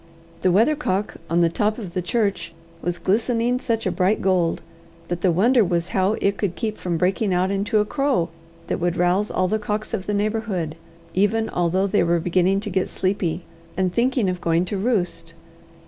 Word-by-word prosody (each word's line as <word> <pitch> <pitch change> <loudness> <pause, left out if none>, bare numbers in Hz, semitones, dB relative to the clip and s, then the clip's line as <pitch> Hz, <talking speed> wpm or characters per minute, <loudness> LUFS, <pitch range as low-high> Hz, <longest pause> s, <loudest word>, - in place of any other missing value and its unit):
The 185 - +3
weathercock 205 - +1
on 170 +1 +2
the 170 - +5
top 210 +5 0
of 195 -8 -7
the 180 - -1
church 200 -3 -1 0.3
was 175 0 -2
glistening 230 +5 +1
such 230 -3 -1
a - - +1
bright 195 +3 +1
gold, 180 -3 +1 0.5
that 175 0 -3
the 185 - +3
wonder 230 +8 +4
was 175 -2 -1
how 190 +2 +1
it 200 -2 0
could 190 -4 -1
keep 215 +6 -3
from 175 -2 -2
breaking 185 +3 +1
out 185 +2 +1
into 200 +2 0
a 210 - +3
crow 265 - 0 0.4
that - - -2
would 175 0 0
rouse 180 +4 +2
all 185 - +1
the 215 +3 0
cocks 210 +2 -3
of 195 -4 -3
the 210 - 0
neighbourhood, 205 -6 -1 0.4
even 220 +3 +1
although 180 +2 +1
they 200 +1 +2
were 170 0 +2
beginning 180 +3 +2
to 210 -1 -5
get 185 +1 0
sleepy, 185 -3 -1 0.3
and 185 -1 +1
thinking 245 -1 +1
of 180 -1 -2
going 170 +1 +2
to 200 +2 -3
roost. 190 -6 -1
190 Hz, 195 wpm, -22 LUFS, 175-215 Hz, 0.5 s, the